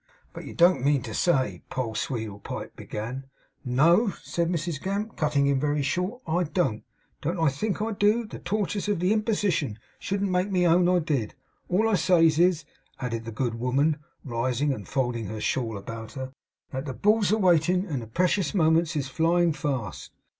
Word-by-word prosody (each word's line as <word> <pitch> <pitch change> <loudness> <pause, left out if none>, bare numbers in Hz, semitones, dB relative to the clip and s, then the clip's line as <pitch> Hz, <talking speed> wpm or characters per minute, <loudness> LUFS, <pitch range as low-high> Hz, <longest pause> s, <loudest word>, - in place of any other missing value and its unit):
'But - - -8
you - - -9
don't 175 -5 +4
mean 140 -3 +2
to 110 - -6
say 135 -1 +1
' - - -41
Poll 125 -4 -3
Sweedlepipe 110 -4 -5
began. 120 +5 -6 0.4
'No,' 165 - +4
said 170 -1 -1
Mrs 170 -3 -2
Gamp, 200 +3 -3
cutting 150 -3 +1
him 140 -1 +2
very 145 0 0
short, 180 - -2
'I 175 +2 +1
don't. 150 - -1 0.4
Don't 165 -1 +1
think 210 +8 -2
I 225 - -1
do. 210 +3 +2
The - - -9
torters 205 -1 -2
of 205 -4 +1
the 180 +4 +2
Imposition 205 - 0 0.2
shouldn't 200 -1 -1
make 180 +2 +1
me 180 -2 +2
own 175 +1 +4
I 180 - +4
did. 145 -10 -1 0.3
All 205 +5 +3
I 225 - +1
says 165 -3 +4
is,' 175 -4 +3 0.3
added 115 -3 -3
the 115 - -5
good 115 0 -2
woman, 140 +5 +1 0.3
rising 130 +3 0
and 105 -6 -8
folding 120 -5 -1
her 110 +1 -5
shawl 115 -1 -1
about 110 +2 -8
her, 130 -1 -6 0.4
'that 130 +1 -4
the 130 - -3
Bull's 210 - +3
a 215 - +3
waitin, 180 -1 +3
and 145 -10 -3
the 115 - -8
precious 180 - +1
moments 165 -1 +3
is 145 -3 0
a 135 - -9
flyin' 170 +2 +2
fast. 135 - -4
160 Hz, 185 wpm, -26 LUFS, 130-180 Hz, 0.4 s, don't